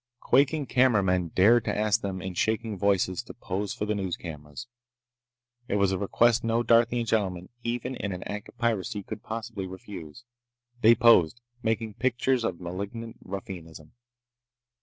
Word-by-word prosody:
Quaking 145 +2 +2
cameramen 100 -10 +3
dared 105 +8 +4
to - - -1
ask 105 +1 +2
them, 95 -3 -4
in 95 -1 -4
shaking 110 +4 0
voices, 95 0 +1
to 120 - -12
pose 100 -3 -3
for 105 - -3
the 105 - 0
news 95 -4 -2
cameras. 75 +5 -8 1.0
It - - -1
was 100 -1 +3
a 95 - 0
request 115 +3 +3
no 115 +1 +1
Darthian 115 +1 +3
gentleman, 95 -5 -1
even 120 +2 -2
in 100 -4 -4
an 90 -1 -5
act 105 0 -6
of - - -19
piracy, 110 -4 -1
could 105 - -7
possibly 110 -3 -5
refuse. 95 -1 -9 0.6
They 115 +2 +7
posed, 115 -5 +5 0.2
making 110 -1 -1
pictures 125 +2 +1
of 90 -6 -2
malignant 100 +6 -6
ruffianism. 85 -5 -8
105 Hz, 155 wpm, -27 LUFS, 95-115 Hz, 1.0 s, They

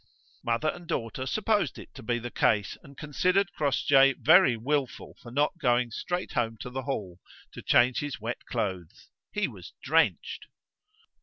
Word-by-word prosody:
Mother 120 +6 0
and 175 +1 -7
daughter 130 +1 -3
supposed 210 -4 0
it - - -12
to 135 - -10
be 120 0 -1
the 120 0 -6
case, 105 -1 +1
and 140 -1 -16
considered 180 +5 +1
Crossjay 135 -1 +4
very 125 -2 +5
wilful 135 +3 -2
for 120 - -11
not 145 +7 0
going 120 -4 +2
straight 175 +9 -3
home 115 -2 -1
to 125 - -6
the 135 +1 -3
Hall 105 -10 -4 0.3
to - - -9
change 125 +1 +3
his 145 -4 -4
wet 115 +2 -5
clothes; 95 -4 -4 0.2
he 210 - 0
was - - -11
drenched. - - +1
130 Hz, 160 wpm, -28 LUFS, 115-150 Hz, 0.3 s, very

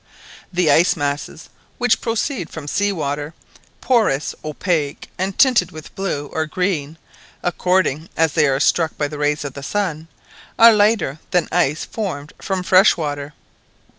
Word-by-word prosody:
The 175 -4 +2
ice 175 +7 +4
masses 145 0 -4 0.3
which 245 -1 +2
proceed 230 - -2
from 155 -3 -8
sea 205 +6 +1
water, 150 -2 -3 0.5
porous, 220 - +1
opaque, 155 -1 -2
and 190 +1 -2
tinged 245 - +4
with 155 -3 -11
blue 175 -7 -3
or 160 0 -1
green, 165 -3 -2 0.5
according 175 -3 0
as 160 -2 +2
they 150 0 +3
are 135 0 +1
struck 160 +2 +1
by 145 - 0
the 150 0 -8
rays 145 0 0
of 140 - -5
the 140 - -8
sun, 165 -2 -2 0.5
are 230 0 +8
lighter 205 -9 +2
than 180 -1 +1
ice 160 -3 +1
formed 165 -9 -5
from 190 -2 -2
fresh 185 +3 +5
water. 145 -2 -4
165 Hz, 150 wpm, -20 LUFS, 145-190 Hz, 0.5 s, are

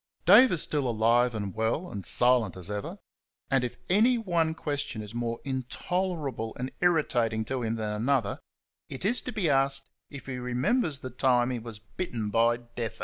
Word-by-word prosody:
Dave 260 +1 +8
is 170 - +5
still 145 -4 0
alive 115 +2 +2
and 100 -3 -4
well, 115 +11 -1
and 100 -2 -6
silent 120 -6 +4
as 90 +2 -6
ever; 105 -1 -5 0.5
and 135 -2 +3
if 125 - -4
any 225 +7 +4
one 170 -7 0
question 145 -7 -4
is 105 +1 -10
more 115 -1 -3
intolerable 135 -2 -3
and 130 +1 -3
irritating 120 -10 +1
to 130 +2 -3
him 115 -1 -1
than 110 -2 -3
another, 125 -5 0 0.5
it 135 +7 -6
is 240 +5 +2
to 250 - -5
be 210 -6 -1
asked 135 -1 +1 0.2
if 140 -3 -10
he 130 -2 -5
remembers 135 - 0
the 130 - -6
time 125 0 +2
he 125 - -3
was 115 -2 -8
bitten 110 - -5
by 115 +2 +3
deaf 120 -1 -6
adder. - - -21
125 Hz, 185 wpm, -28 LUFS, 115-150 Hz, 0.5 s, Dave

